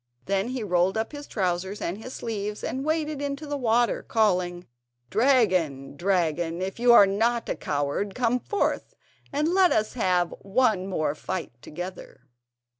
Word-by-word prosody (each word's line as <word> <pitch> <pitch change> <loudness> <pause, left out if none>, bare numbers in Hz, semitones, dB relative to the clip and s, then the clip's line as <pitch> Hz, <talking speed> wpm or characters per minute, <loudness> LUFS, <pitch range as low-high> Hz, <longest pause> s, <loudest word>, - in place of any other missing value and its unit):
Then 195 +2 0
he 255 -2 -3
rolled 180 +1 +1
up 220 - -2
his 290 -1 -8
trousers 190 0 -2
and 180 +5 -3
his 250 +3 -8
sleeves, 210 -2 -4
and 265 +1 -3
waded 310 -1 -1
into 285 +1 -3
the 290 0 -3
water, 240 -2 +2
calling: 180 -5 0 0.5
"Dragon! 185 - +2
dragon! 170 -2 0
if 190 +4 -4
you 240 0 +5
are 220 -4 +9
not 230 +4 0
a - - -1
coward, 145 +8 -2
come 250 0 +1
forth, 410 +10 -2 0.4
and 295 +2 0
let 370 0 +4
us 215 0 +1
have 180 -7 +1
one 200 -2 +1
more 155 -6 -1
fight 180 +3 -4
together." 175 -2 -8
205 Hz, 155 wpm, -26 LUFS, 180-250 Hz, 0.5 s, are